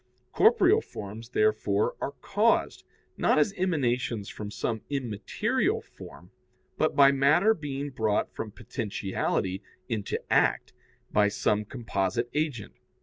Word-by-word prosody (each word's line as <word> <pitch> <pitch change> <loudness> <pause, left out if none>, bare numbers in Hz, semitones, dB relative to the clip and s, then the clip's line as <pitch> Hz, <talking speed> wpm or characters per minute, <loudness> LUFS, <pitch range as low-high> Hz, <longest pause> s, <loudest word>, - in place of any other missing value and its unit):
Corporeal 440 -2 +5
forms, 110 - -9
therefore, 105 -2 +1
are 140 - -3
caused, 215 +3 +1 0.3
not - - +3
as 200 - +3
emanations 125 - -1
from 105 -1 -7
some 110 +1 -3
immaterial 150 - -1
form, - - -14 0.4
but - - 0
by 140 -1 +7
matter 150 +10 +4
being 145 -5 -5
brought 110 -4 0
from 110 - -5
potentiality 100 -3 -3 0.3
into 105 -3 -2
act - - +2 0.4
by 105 -1 +4
some 105 +1 0
composite 115 0 -2
agent. 150 -8 -2
120 Hz, 115 wpm, -28 LUFS, 105-155 Hz, 0.4 s, by